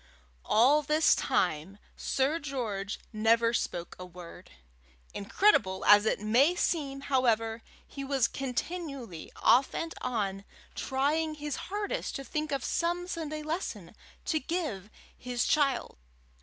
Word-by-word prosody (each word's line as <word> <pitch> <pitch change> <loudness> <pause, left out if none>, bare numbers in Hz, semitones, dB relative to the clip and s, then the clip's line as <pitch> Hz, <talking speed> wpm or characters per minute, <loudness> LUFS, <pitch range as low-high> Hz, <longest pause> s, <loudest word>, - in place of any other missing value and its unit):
All 265 +8 +4
this 305 +1 +4
time 180 - 0 0.2
Sir 275 +5 0
George 225 -9 -4
never 230 +2 +3
spoke 175 -6 -3
a - - -6
word. 180 -1 -11 0.6
Incredible 200 - +2
as 210 +1 +7
it - - +1
may 245 - +3
seem, 280 -6 -1
however, 230 -4 +1 0.2
he 275 - -7
was 270 -3 +2
continually, 270 - -5
off 260 +3 +4
and 330 0 -3
on, 200 -6 -2 0.3
trying 305 +4 0
his 295 -1 -4
hardest 415 +5 -3
to 275 - -4
think 305 +4 -3
of 275 -3 -1
some 350 +1 -1
Sunday 310 -3 -4
lesson 325 +5 -4 0.3
to 315 - +1
give 280 - -3 0.3
his 245 -1 -2
child. 275 - +1
270 Hz, 125 wpm, -30 LUFS, 215-305 Hz, 0.6 s, as